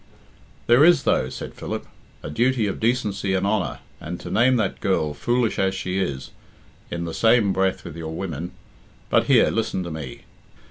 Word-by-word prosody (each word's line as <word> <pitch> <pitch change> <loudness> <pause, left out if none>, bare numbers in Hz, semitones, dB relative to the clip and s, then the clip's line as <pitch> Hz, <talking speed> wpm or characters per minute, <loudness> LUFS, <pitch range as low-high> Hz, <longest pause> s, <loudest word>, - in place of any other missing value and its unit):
"There 120 +4 +6
is, 175 +1 +6
though," - - +2
said - - -7
Philip, - - -5 0.4
"a - - -5
duty 120 - +2
of 100 - -3
decency 105 -5 0
and 95 - 0
honour, 100 -2 -1 0.2
and 85 +3 -6
to - - -7
name 125 +3 +4
that 110 -5 -1
girl, 80 -6 +1
foolish 120 +9 0
as 95 0 +1
she 95 0 -2
is, 65 -8 -3 0.6
in 85 0 -3
the 85 - -5
same 110 -2 +3
breath 95 0 0
with - - -7
your 80 -1 -6
women 85 -2 -4 0.6
But - - +4
here, - - +5
listen 110 -4 -1
to 85 - -6
me. 75 -5 -7
95 Hz, 180 wpm, -23 LUFS, 85-115 Hz, 0.6 s, There